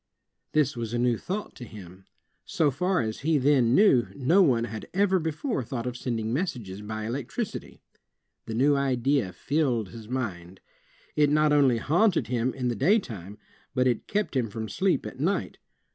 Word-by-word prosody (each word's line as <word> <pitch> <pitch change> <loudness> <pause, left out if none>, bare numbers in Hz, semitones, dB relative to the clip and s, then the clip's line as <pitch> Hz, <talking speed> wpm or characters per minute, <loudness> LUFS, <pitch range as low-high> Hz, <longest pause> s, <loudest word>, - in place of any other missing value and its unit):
This 150 -2 +2
was 115 -1 -4
a - - +1
new 120 0 +2
thought 195 - -5
to - - -8
him. 95 -5 -12 0.4
So 150 -3 +1
far 180 +6 0
as 110 -1 -3
he 155 +2 +2
then 130 -3 +3
knew, 165 - +5
no 150 +9 +4
one 125 -10 +3
had 110 -2 -6
ever 195 -1 +3
before 160 - -2
thought 120 0 -5
of 125 -1 -3
sending 115 -3 -3
messages 120 - -3
by 110 +1 -5
electricity. 135 - -5 0.7
The 110 - -4
new 140 +4 +4
idea 135 -5 +1
filled 125 -6 -1
his 115 0 -11
mind. 95 -8 -4 0.6
It 150 -1 +4
not 150 0 +3
only 135 -5 +4
haunted 175 - +2
him 125 0 0
in 125 -2 -2
the 120 - 0
day 195 - +4
time, 105 - -7 0.4
but 130 -1 +2
it 125 -3 0
kept 210 -6 -1
him 120 -4 0
from 110 +2 -5
sleep 185 - 0
at 130 - -8
night. 180 +8 -1
130 Hz, 175 wpm, -27 LUFS, 115-150 Hz, 0.7 s, knew